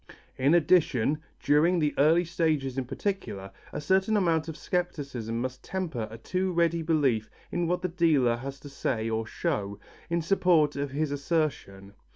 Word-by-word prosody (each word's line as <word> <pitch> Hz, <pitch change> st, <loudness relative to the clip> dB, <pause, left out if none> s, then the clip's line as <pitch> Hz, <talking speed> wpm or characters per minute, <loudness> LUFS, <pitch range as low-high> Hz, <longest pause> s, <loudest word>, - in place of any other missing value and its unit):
In 140 Hz, +5 st, +3 dB
addition, 150 Hz, -5 st, +3 dB, 0.2 s
during 160 Hz, +5 st, +4 dB
the 150 Hz, -3 st, +1 dB
early 165 Hz, +5 st, +5 dB
stages 155 Hz, -6 st, 0 dB
in 135 Hz, -1 st, -2 dB
particular, 120 Hz, -, -4 dB, 0.2 s
a -, -, -4 dB
certain 190 Hz, +7 st, +2 dB
amount 165 Hz, -5 st, +1 dB
of 160 Hz, -, -6 dB
scepticism 140 Hz, -10 st, -3 dB
must 130 Hz, +1 st, -4 dB
temper 160 Hz, -12 st, -3 dB
a 110 Hz, -, -9 dB
too 185 Hz, +8 st, -2 dB
ready 170 Hz, -1 st, +1 dB
belief 140 Hz, -9 st, +1 dB, 0.2 s
in 175 Hz, -1 st, 0 dB
what 180 Hz, +1 st, -1 dB
the -, -, +1 dB
dealer 155 Hz, -9 st, +2 dB
has 135 Hz, +2 st, -7 dB
to 145 Hz, -, -10 dB
say 115 Hz, -5 st, -2 dB
or 110 Hz, 0 st, -1 dB
show, 100 Hz, -2 st, -2 dB, 0.3 s
in 170 Hz, -1 st, 0 dB
support 165 Hz, -4 st, +3 dB
of 140 Hz, 0 st, -2 dB
his 145 Hz, +2 st, -2 dB
assertion. 140 Hz, -, -2 dB
150 Hz, 165 wpm, -28 LUFS, 130-170 Hz, 0.3 s, early